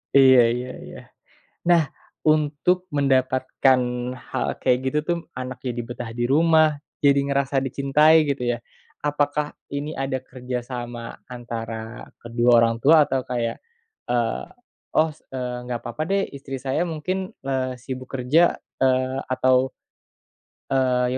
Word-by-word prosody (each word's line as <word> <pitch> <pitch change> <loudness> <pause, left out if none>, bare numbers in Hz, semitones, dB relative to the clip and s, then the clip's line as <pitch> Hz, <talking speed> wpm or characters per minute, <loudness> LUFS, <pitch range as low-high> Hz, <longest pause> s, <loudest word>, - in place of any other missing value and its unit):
Iya 130 -2 +8
iya 125 +1 -4
iya. - - -10 0.6
Nah, 170 -3 +4 0.4
untuk 155 +4 +2
mendapatkan 130 -1 +2 0.5
hal - - -1
kayak 125 - +3
gitu 130 +3 0
tuh, 175 -1 +1
anak 130 -1 -7
jadi 125 -2 -3
betah 120 -1 -6
di 120 +1 -1
rumah, 155 +2 +4 0.2
jadi 140 -1 +4
ngerasa 140 -1 0
dicintai, 150 +4 +4
gitu 140 -3 -1
ya. 120 - -3 0.4
Apakah 145 0 -1 0.2
ini 145 +2 -4
ada 135 -1 -2
kerja 125 -1 -5
sama 120 -2 -6 0.2
antara 115 -2 -6 0.2
kedua 120 +1 +1
orang 115 0 +3
tua 155 0 +6
atau 130 -1 -1
kayak, 120 -2 -3 0.5
eee, 120 -2 0 0.5
"Oh, 160 +1 +3
s - - -26
enggak 125 -1 -4
apa-apa 120 +6 -4
deh, 195 0 +2
istri 135 -1 -6
saya 135 +5 0
mungkin, 185 +3 -3 0.2
eee, 130 -2 -1
sibuk 130 +1 -7
kerja, 135 +7 +3 0.2
eee, 130 0 +2
atau, 130 0 +3 1.0
eee, 125 -1 +2
130 Hz, 130 wpm, -23 LUFS, 125-145 Hz, 1.0 s, Iya